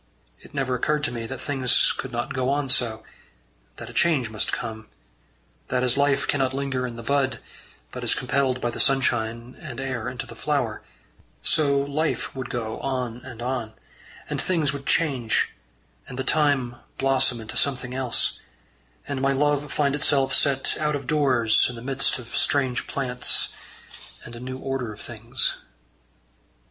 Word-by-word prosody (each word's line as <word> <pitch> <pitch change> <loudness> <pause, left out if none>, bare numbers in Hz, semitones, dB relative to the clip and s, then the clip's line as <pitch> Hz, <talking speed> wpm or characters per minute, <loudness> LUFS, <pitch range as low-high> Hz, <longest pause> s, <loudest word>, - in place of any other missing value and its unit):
It - - -15
never 135 -2 0
occurred 150 +4 0
to 135 - +1
me 115 -2 -4
that 135 0 -6
things 130 -3 +3
could 130 - -5
not 120 -1 -3
go 130 -1 0
on 140 -1 0
so; 110 -4 +1 0.7
that - - -7
a - - -9
change 140 -10 +2
must 110 - -1
come; 110 -1 -5 0.8
that 125 0 0
as 125 -2 +4
life 140 0 +2
cannot 135 -2 +1
linger 135 -2 -1
in 120 - -7
the 115 - -8
bud, 135 +1 +1 0.5
but - - -6
is - - +4
compelled 130 -2 +1
by 120 -1 -1
the - - -7
sunshine 120 -2 +1
and 135 -7 -6
air 130 -4 -3
into 125 -1 -5
the - - -11
flower, 135 -8 -1 0.6
so 140 -3 +4
life 140 +2 -1
would 130 -2 -5
go 110 -2 -3
on 125 -4 -2
and 125 -2 -9
on, 125 -3 -2 0.5
and - - -1
things 160 -6 +1
would 140 0 -7
change, 130 -8 +2 0.5
and 125 - -8
the 130 - -1
time 135 -4 +1 0.2
blossom 135 -3 +2
into 110 -1 -6
something 130 -3 0
else, 130 -2 +1 0.7
and 140 -2 -3
my 135 0 +3
love 145 +1 +1
find 140 -2 +1
itself 145 -2 +3
set 135 -2 +3
out 150 -1 +1
of 140 -2 -5
doors 130 -6 +3
in 125 - -6
the - - -8
midst 135 +1 +1
of 120 -2 -9
strange 130 -4 +1
plants 125 -2 +2 0.8
and 120 - -9
a - - -8
new 130 +1 -5
order 130 -4 -3
of 105 - -11
things. 120 +2 -1
130 Hz, 170 wpm, -25 LUFS, 120-140 Hz, 0.8 s, as